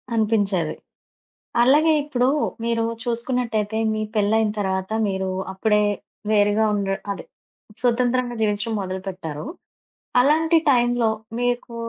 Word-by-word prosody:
అనిపించేది. 200 -7 +1 0.9
అలాగే, 300 +6 +5
ఇప్పుడు 255 -4 0 0.4
మీరు 230 -1 +1 0.2
చూసుకున్నట్టయితే 235 -3 -1 0.2
మీ 215 - -2
పెళ్ళయిన 215 +1 +2
తర్వాత 190 0 -2 0.2
మీరు 190 0 -2 0.2
అప్పుడే 210 +2 +2 0.5
వేరుగా 205 +1 +3
ఉండ 200 -1 -1 0.2
అదే 195 - -6 0.6
స్వతంత్రంగా 245 0 +1
జీవించడం 210 +1 0
మొదలుపెట్టారు. 185 -3 -5 0.8
అలాంటి 320 +5 +3
టైంలో 240 -2 +3 0.3
మీకు 245 -1 -1
220 Hz, 95 wpm, -22 LUFS, 205-245 Hz, 0.9 s, అలాగే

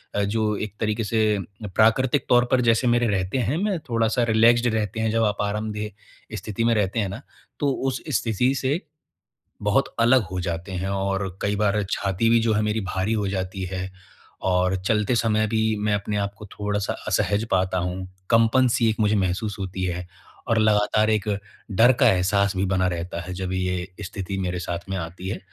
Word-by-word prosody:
अ, 105 - +2
जो 105 +1 0
एक 105 -1 -5
तरीके 110 +1 0
से 110 -1 +1 0.4
प्राकृतिक 120 +5 +3
तौर 120 0 +5
पर 130 -1 +4
जैसे 115 +1 +3
मेरे 120 0 +3
रहते 95 +2 -1
हैं, 130 +4 0
मैं 195 -1 0
थोड़ा-सा 115 +1 +1
रिलैक्स्ड 115 +2 +5
रहते 110 0 -2
हैं, 110 0 +1
जब 115 0 +2
आप 105 -1 +1
आरामदेह 105 +1 -5
स्थिति 105 +3 -3
में 115 - +4
रहते 105 +1 0
हैं 100 -3 0
ना, 95 - -7 0.4
तो 145 -1 +2 0.2
उस 130 - -4 0.2
स्थिति 125 +3 +1
से, 135 +4 0 0.8
बहुत - - +1
अलग 120 +2 +5
हो 90 0 -3
जाते 85 +1 -4
हैं 95 +1 -3
और 95 -1 -2
कई 100 0 0
बार 105 0 +1
छाती 100 +3 0
भी 115 0 +5
जो 115 0 +1
है 105 - +1
मेरी 105 +1 0
भारी 95 +1 -2
हो 105 -2 0
जाती 95 0 -3
है 95 0 -4 0.6
और 90 +1 +2
चलते 105 +2 +2
समय 110 -1 +2
भी 110 0 +1
मैं 105 0 +1
अपने 105 +1 -2
आप 100 0 -1
को 105 - -9
थोड़ा-सा 105 -1 -2 0.2
असहज 105 +2 +1
पाता 95 0 +1
हूँ। 90 +1 -3 0.3
कंपन 115 +3 +4
सी 115 - +2
एक 110 - -2
मुझे 105 0 +3
महसूस 100 +2 -1
होती 95 -1 -3
है 90 0 -3 0.4
और 115 -1 +3
लगातार 110 0 +3
एक, 110 -1 0 0.4
डर 115 +6 +6
का - - +7
एहसास 100 +2 +1
भी 95 - +1
बना 95 -1 +1
रहता 85 0 -4
है 90 +1 -7
जब 95 0 -4
ये 90 -1 -1 0.2
स्थिति 95 0 -5
मेरे 90 -1 -2
साथ 85 +1 -5
में 95 - -1
आती 90 +2 -6
है 100 - -3
105 Hz, 195 wpm, -24 LUFS, 95-110 Hz, 0.8 s, का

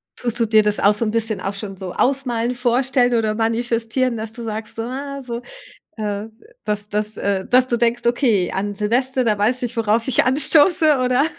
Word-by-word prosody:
Tust 240 -1 -4
du 230 - +3
dir 215 -1 +4
das 210 0 0
auch 205 +1 +4
so 210 - -2
'n 215 - -1
bisschen 225 -2 -1
auch 195 - -3
schon 200 -1 -7
so 185 -1 -7
ausmalen, 250 -3 0
vorstellen 245 0 +1
oder 220 -2 0
manifestieren, 230 +2 0
dass 220 0 -5
du 235 +1 -9
sagst, 220 -1 -5
so, 225 - -2
ah, 275 +3 -5
so, 240 -2 -5 0.6
äh, 210 0 -3 0.4
dass 210 0 -2
dass 210 0 -2
äh, 195 -1 -1
dass 255 +1 +4
du 240 - 0
denkst: 235 +1 0
„Okay, 235 -7 +2
an 205 +1 -3
Silvester, 250 +5 +1
da 215 -2 +2
weiß 240 +5 +1
ich, 240 0 -4
worauf 225 +1 +1
ich 265 - +2
anstoße“ 300 +3 +4
oder 255 +2 +2
230 Hz, 200 wpm, -20 LUFS, 215-250 Hz, 0.6 s, dir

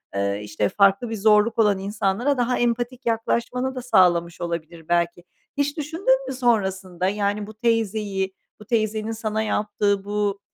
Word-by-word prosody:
eee, 100 0 0
işte, 105 0 -1
farklı 200 +3 +3
bir 225 - -3
zorluk 215 +2 +3
olan 210 -3 +4
insanlara 205 +7 0
daha 245 +1 +1
empatik 240 +2 -1
yaklaşmanı 235 +3 -1
da 255 - -4
sağlamış 175 -8 +3
olabilir 170 -1 -5
belki. 175 0 0 0.3
Hiç 285 +1 0
düşündün 390 - +1
mü - - -3
sonrasında, 190 -7 0
yani, 205 0 -1
bu 215 - -10
teyzeyi, 215 -4 -1 0.3
bu - - -11
teyzenin 220 -1 0
sana 220 -1 -2
yaptığı 205 -2 0
bu 205 0 -1
210 Hz, 150 wpm, -23 LUFS, 190-235 Hz, 0.3 s, olan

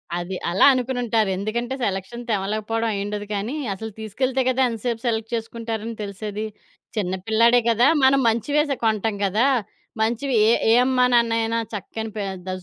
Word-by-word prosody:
అది 175 +2 -4
అలా 180 +8 +4
అనుకునుంటారు. 245 -4 0
ఎందుకంటే 235 +6 -2
సెలక్షన్ 195 +5 -4
తెమలకపోవడం 215 +3 -1
ఐయుండదు 205 +1 -3
కానీ, 215 +8 -3 0.2
అసలు 220 +3 -7
తీసుకెళ్తే 255 +5 -1
కదా 255 +1 +1
ఎంతసేపు 230 0 -3
సెలెక్ట్ 225 0 -2
చేసుకుంటారని 225 0 -4
తెలిసేది. 210 +1 -5 0.5
చిన్న 190 -2 0
పిల్లాడే 230 +2 +5
కదా! 235 +3 +4 0.2
మనం 270 +1 +5
మంచివే 235 +7 +1
సే 275 - +1
కొంటాం 220 -1 +1
కదా! 210 +6 +2 0.6
మంచివి 240 +5 0
ఏ - - +5 0.2
ఏ - - +6
అమ్మా 255 -1 +3
నాన్నైనా 230 -1 +2
చక్కని 220 +2 -5
ప - - -7 0.3
ద - - -3
225 Hz, 145 wpm, -23 LUFS, 210-240 Hz, 0.6 s, ఏ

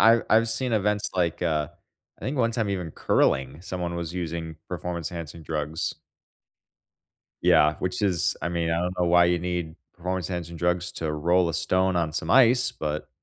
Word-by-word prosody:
I 115 0 +7
I've 115 +1 +5
seen 120 +3 -2
events 105 -1 +1
like, 85 -2 0
uh, 75 -3 0 0.5
I - - -10
think 135 +3 -2
one 115 -3 +2
time 115 -3 -1
even 90 -4 -3
curling, 70 0 +1
someone 90 -2 -4
was 85 -1 -4
using 80 -2 -4
performance-enhancing 85 -2 -5
drugs. 80 0 -3 1.5
Yeah, 75 0 +5
which 90 +2 -2
is 95 -5 +1
I - - 0
mean, 85 -1 -1
I 85 - +1
don't 90 +1 -3
know 90 - +2
why 85 0 +5
you 90 0 +2
need 85 -2 -3 0.2
performance 90 0 -3
enhancing 85 -2 -4
drugs 85 0 0
to 80 -2 -3
roll 85 +3 +2
a 85 - -3
stone 95 +1 +1
on 80 -3 0
some - - -3
ice, 125 0 +5
but 75 -8 -4
85 Hz, 175 wpm, -26 LUFS, 80-95 Hz, 1.5 s, I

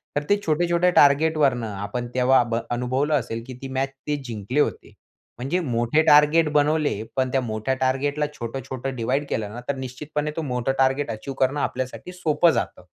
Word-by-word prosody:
तर 145 - 0
ते 205 - +5
छोटे-छोटे 170 +3 +2
टार्गेटवरुन 145 -3 +4
आपण 105 +3 -4
तेव्हा 130 0 +4
भ 115 - 0 0.2
अनुभवलं 130 +5 0
असेल, 115 -2 -5
की 130 - -7
ती 135 - -5
मॅच 135 +1 0 0.2
ते 150 - +1
जिंकले 115 +3 -3
होते. - - -1 0.4
म्हणजे 135 +9 -1
मोठे 120 -1 +1
टार्गेट 150 +1 +6
बनवले, 150 -5 +2
पण 130 -1 0
त्या 135 - +1
मोठ्या 110 +2 -2
टार्गेटला 140 +3 +1
छोटं-छोटं 130 +1 -5
डिव्हाईड 130 +5 -1
केलं 105 -1 -3
ना, 120 - -7
तर 140 - +1
निश्चितपणे 145 +4 -4
तो - - 0
मोठा 125 +1 0
टार्गेट 135 +1 +2
अचीव्ह 130 +5 -6
करणं 135 +3 +2
आपल्यासाठी 130 +7 -4
सोपं 170 -1 +3
जातं. - - -3
135 Hz, 170 wpm, -23 LUFS, 125-150 Hz, 0.4 s, टार्गेट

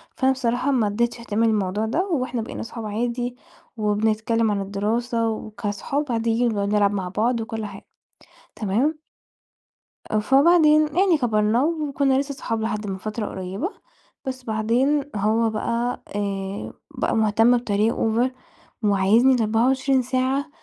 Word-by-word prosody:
فأنا 265 0 +3
بصراحة 255 +1 0
ما 240 -6 +2
ادِّيتِش 235 +4 -1
اهتمام 230 0 +1
للموضوع 205 0 0
ده، 325 - 0
وإحنا 255 -8 -1
بقينا 220 - -6
أصحاب 230 0 -7
عادي 240 +3 -2 0.4
وبنتكلَّم 220 +1 +1
عن 200 - -1
الدراسة 225 +4 -1
وكأصحاب 220 +6 -3
عاديِّين، 230 +1 +1
بنقعُد 200 -2 -1
نلعَب 205 -1 +3
مع 190 -3 -3
بعض 230 +5 0
وكل 220 -1 -4
حاجة، 195 -1 -10 0.7
تمام؟ 235 +10 0 1.1
آه، 215 - +2
فبعدين 305 +5 +5
يعني 370 -3 +4
كَبرنا 225 -2 +2
وكنّا 285 -4 +1
لسه 280 0 -3
صُحاب 225 -4 -3
لحد 215 -1 -2
من 190 -1 -3
فترة 215 +3 -4
قريبة، 190 - -4 0.6
بس 260 -1 -5
بعدين 240 +6 +1
هو 220 +3 +2
بقى 235 +3 -2
آآ، 195 -1 -3 0.2
بقى - - -1
مهتم 225 +2 +4
بطريقة 220 -1 0
over، 230 +3 +1 0.5
وعايِزني 210 +6 +4
ال24 255 +4 +2
ساعة 260 +3 -1
230 Hz, 135 wpm, -23 LUFS, 210-260 Hz, 1.1 s, فبعدين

